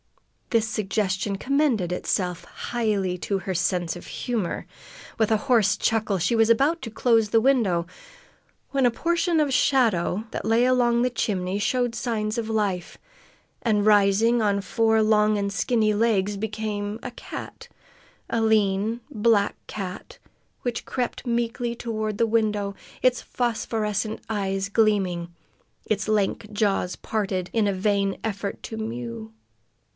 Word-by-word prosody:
This 225 Hz, -2 st, +2 dB
suggestion 200 Hz, -2 st, -1 dB
commended 250 Hz, -, +1 dB
itself 180 Hz, -1 st, -1 dB
highly 210 Hz, -6 st, -2 dB
to 200 Hz, +2 st, -1 dB
her 190 Hz, 0 st, -4 dB
sense 175 Hz, -1 st, 0 dB
of 175 Hz, -, -10 dB
humor. 230 Hz, -8 st, -3 dB, 0.5 s
With 220 Hz, -1 st, +2 dB
a 220 Hz, -, +5 dB
hoarse 215 Hz, -5 st, +4 dB
chuckle 220 Hz, -3 st, +1 dB
she 180 Hz, +7 st, +1 dB
was 225 Hz, 0 st, +4 dB
about 280 Hz, +9 st, +3 dB
to 230 Hz, -, -5 dB
close 225 Hz, -1 st, +2 dB
the 225 Hz, -, +4 dB
window 220 Hz, -10 st, +2 dB, 0.9 s
when 275 Hz, -2 st, +2 dB
a 245 Hz, -, +4 dB
portion 335 Hz, +5 st, +1 dB
of 300 Hz, -, +3 dB
the -, -, -2 dB
shadow 220 Hz, -7 st, +2 dB
that -, -, -4 dB
lay 225 Hz, +2 st, +3 dB
alongside 245 Hz, -1 st, +3 dB
the -, -, +2 dB
chimney 195 Hz, -4 st, -1 dB
showed 240 Hz, +2 st, 0 dB
signs 225 Hz, -2 st, -2 dB
of 225 Hz, -1 st, -4 dB
life, 200 Hz, -5 st, -1 dB, 0.6 s
and, 210 Hz, -3 st, +1 dB
rising 210 Hz, +3 st, +4 dB
on 200 Hz, -2 st, +2 dB
four 220 Hz, +3 st, +2 dB
long 215 Hz, 0 st, +3 dB
and 200 Hz, 0 st, -2 dB
skinny 215 Hz, +1 st, +2 dB
legs, 210 Hz, -2 st, +1 dB
became 210 Hz, 0 st, -3 dB
a -, -, -5 dB
cat -, -, -9 dB, 0.6 s
a 230 Hz, -, 0 dB
lean, 220 Hz, +1 st, +2 dB
black 220 Hz, -5 st, +2 dB
cat, 190 Hz, -3 st, -7 dB, 0.5 s
which 245 Hz, -2 st, -2 dB
crept 250 Hz, -1 st, -3 dB
meekly 235 Hz, 0 st, -1 dB
toward 220 Hz, -3 st, -3 dB
the 230 Hz, -, +2 dB
window, 210 Hz, -3 st, 0 dB, 0.3 s
its 255 Hz, -1 st, +3 dB
phosphorescent 220 Hz, -3 st, -2 dB
eyes 195 Hz, -2 st, -1 dB
gleaming, 195 Hz, -5 st, +1 dB, 0.5 s
its 215 Hz, 0 st, -1 dB
lank 210 Hz, 0 st, 0 dB
jaws 205 Hz, -4 st, 0 dB
parted 190 Hz, -4 st, -2 dB
in 220 Hz, -3 st, +2 dB
a 200 Hz, -, +1 dB
vain 195 Hz, 0 st, 0 dB
effort 200 Hz, -2 st, -3 dB
to 225 Hz, -, -6 dB
mew. 115 Hz, -, -5 dB
215 Hz, 140 wpm, -25 LUFS, 195-230 Hz, 0.9 s, a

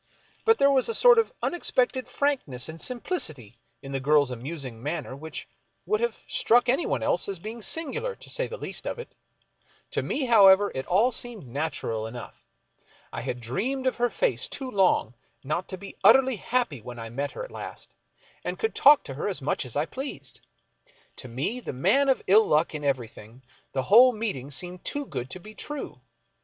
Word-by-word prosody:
But 450 Hz, 0 st, +5 dB
there 280 Hz, 0 st, +5 dB
was 265 Hz, -, +2 dB
a 455 Hz, -, -1 dB
sort 485 Hz, -2 st, +7 dB
of 455 Hz, -, +1 dB
unexpected 260 Hz, -6 st, 0 dB
frankness 255 Hz, -, -1 dB
and 160 Hz, +1 st, -9 dB
simplicity 155 Hz, -, -4 dB, 0.2 s
in 135 Hz, -, -8 dB
the 135 Hz, -, -1 dB
girl's 145 Hz, -1 st, +3 dB
amusing 130 Hz, -2 st, -6 dB
manner 145 Hz, -1 st, -4 dB
which 160 Hz, +3 st, -7 dB, 0.4 s
would 430 Hz, +1 st, 0 dB
have 475 Hz, -, -1 dB
struck 245 Hz, +2 st, +3 dB
anyone 265 Hz, +7 st, +1 dB
else -, -, +1 dB
as 195 Hz, -, -3 dB
being 220 Hz, +6 st, -7 dB
singular, 335 Hz, -, -1 dB
to -, -, -13 dB
say -, -, 0 dB
the 485 Hz, -, -7 dB
least -, -, -4 dB
of -, -, -3 dB
it. 475 Hz, -, -9 dB, 0.8 s
To -, -, 0 dB
me, 280 Hz, -, -2 dB
however, 205 Hz, -4 st, +6 dB
it 130 Hz, -, -4 dB
all 210 Hz, +8 st, +3 dB
seemed 235 Hz, -, -4 dB
natural 120 Hz, -5 st, -3 dB
enough. 120 Hz, +1 st, -10 dB, 0.7 s
I -, -, -4 dB
had 125 Hz, -, -4 dB
dreamed 235 Hz, -, -2 dB
of 260 Hz, -, +1 dB
her 245 Hz, 0 st, +2 dB
face -, -, 0 dB
too 265 Hz, -2 st, -6 dB
long 185 Hz, -, +2 dB, 0.3 s
not 155 Hz, +7 st, -2 dB
to 190 Hz, -, -6 dB
be 200 Hz, +1 st, -10 dB
utterly 265 Hz, -3 st, +6 dB
happy 230 Hz, -, -1 dB
when 120 Hz, +2 st, -9 dB
I 115 Hz, -1 st, -7 dB
met 140 Hz, +4 st, -3 dB
her -, -, -5 dB
at -, -, -13 dB
last -, -, -8 dB, 0.5 s
and -, -, -3 dB
could 445 Hz, -, -1 dB
talk 290 Hz, 0 st, +6 dB
to 135 Hz, -, -7 dB
her 140 Hz, -, -3 dB
as 195 Hz, -, -1 dB
much 140 Hz, 0 st, -1 dB
as 125 Hz, -, -7 dB
I 145 Hz, +2 st, +1 dB
pleased. 270 Hz, -, -7 dB, 0.8 s
To 130 Hz, -, -7 dB
me, 135 Hz, -, -3 dB
the 245 Hz, -, -6 dB
man 205 Hz, -, +3 dB
of 265 Hz, -, +2 dB
ill 215 Hz, +3 st, +5 dB
luck 155 Hz, +2 st, +2 dB
in 150 Hz, -1 st, -5 dB
everything, 120 Hz, -3 st, -4 dB, 0.3 s
the 130 Hz, -, -1 dB
whole 245 Hz, -, +7 dB
meeting 205 Hz, -, -3 dB
seemed 175 Hz, +6 st, -6 dB
too 285 Hz, 0 st, -3 dB
good 125 Hz, -, -5 dB
to 185 Hz, -, -5 dB
be 215 Hz, +4 st, -12 dB
true. 295 Hz, +5 st, -7 dB
190 Hz, 195 wpm, -26 LUFS, -, 0.8 s, sort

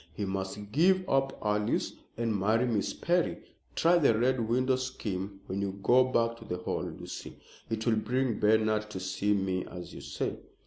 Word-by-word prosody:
He 105 Hz, -, -2 dB
must 95 Hz, +1 st, -4 dB
give 185 Hz, -, +3 dB
up 135 Hz, 0 st, +1 dB
Alice 105 Hz, 0 st, 0 dB, 0.2 s
and 115 Hz, -2 st, 0 dB
marry 110 Hz, +5 st, +2 dB
Miss 110 Hz, -5 st, 0 dB
Perry. 175 Hz, 0 st, +1 dB, 0.4 s
Try 170 Hz, +1 st, +4 dB
the 125 Hz, -8 st, +4 dB
Red 120 Hz, -1 st, +1 dB
Window 130 Hz, +2 st, +3 dB
scheme 100 Hz, -7 st, -4 dB
when 95 Hz, +2 st, -3 dB
you 100 Hz, -1 st, -3 dB
go 125 Hz, +1 st, +6 dB
back 115 Hz, -2 st, +1 dB
to -, -, -11 dB
the 90 Hz, -, -3 dB
Hall, 90 Hz, -, -2 dB
Lucy. -, -, -8 dB, 0.3 s
It 110 Hz, 0 st, -2 dB
will 115 Hz, -2 st, +3 dB
bring 125 Hz, +1 st, 0 dB
Bernard 110 Hz, 0 st, +3 dB
to 95 Hz, -, -5 dB
see 95 Hz, +2 st, 0 dB
me, 95 Hz, -2 st, 0 dB
as 90 Hz, 0 st, -9 dB
you -, -, -8 dB
say." -, -, -3 dB
110 Hz, 180 wpm, -30 LUFS, 100-130 Hz, 0.4 s, go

